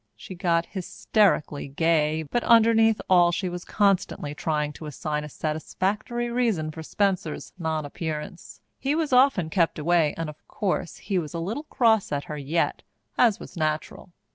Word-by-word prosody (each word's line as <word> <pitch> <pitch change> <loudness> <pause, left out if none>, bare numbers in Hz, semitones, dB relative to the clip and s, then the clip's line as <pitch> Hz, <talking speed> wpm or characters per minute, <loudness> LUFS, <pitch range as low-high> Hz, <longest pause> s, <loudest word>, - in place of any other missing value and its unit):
She - - -10
got 170 -2 +1
hysterically 190 -5 0
gay, 155 +1 +1
but 235 +11 -2
underneath 225 -1 +5
all 175 -2 +5
she 185 +2 -2
was 175 0 -6
constantly 195 -7 0
trying 150 -1 -1
to 155 - -9
assign 150 0 -3
a 150 - -7
satisfactory 200 - -2
reason 220 -11 0
for 160 - -8
Spencer's 185 -1 -1
nonappearance. 160 +1 -4 0.2
He 275 +3 0
was 315 -4 -1
often 250 - +4
kept 170 -3 +1
away, 160 -1 +2
and 165 -1 -3
of 150 0 -10
course 190 -4 -2
he 190 -2 -1
was 160 0 -6
a - - -2
little 220 - -4
cross 225 -7 +2
at 145 -1 -1
her 150 - -6
yet, 155 +4 -1 0.3
as 230 -5 +3
was - - -11
natural. 155 +2 -3
170 Hz, 160 wpm, -25 LUFS, 155-210 Hz, 0.3 s, underneath